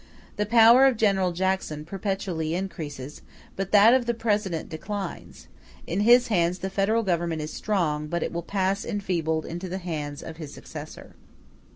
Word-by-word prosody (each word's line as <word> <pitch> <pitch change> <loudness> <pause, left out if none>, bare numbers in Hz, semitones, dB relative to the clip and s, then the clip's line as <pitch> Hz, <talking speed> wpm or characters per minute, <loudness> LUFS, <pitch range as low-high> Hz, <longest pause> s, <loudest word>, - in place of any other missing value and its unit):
The 210 0 0
power 235 +4 +7
of 260 -4 +1
General 195 -4 +2
Jackson 175 -4 -2
perpetually 180 -3 -3
increases; 155 -7 -6 0.3
but 195 0 -4
that 215 +3 +7
of 255 -2 +2
the 235 - 0
President 210 -7 -1
declines; 190 +3 -6 0.4
in 175 - -2
his 240 +3 +5
hands 175 -3 +1
the 190 +1 -5
Federal 215 +4 +1
Government 170 -4 -1
is 155 - -6
strong, 155 -8 -1
but 170 +2 -2
it - - -3
will 170 - -2
pass 195 +2 -1
enfeebled 170 -6 -2
into 175 +2 -6
the 185 - -3
hands 150 -6 -5
of 160 0 -8
his 155 -4 -8
successor. - - -10
190 Hz, 165 wpm, -25 LUFS, 165-205 Hz, 0.4 s, power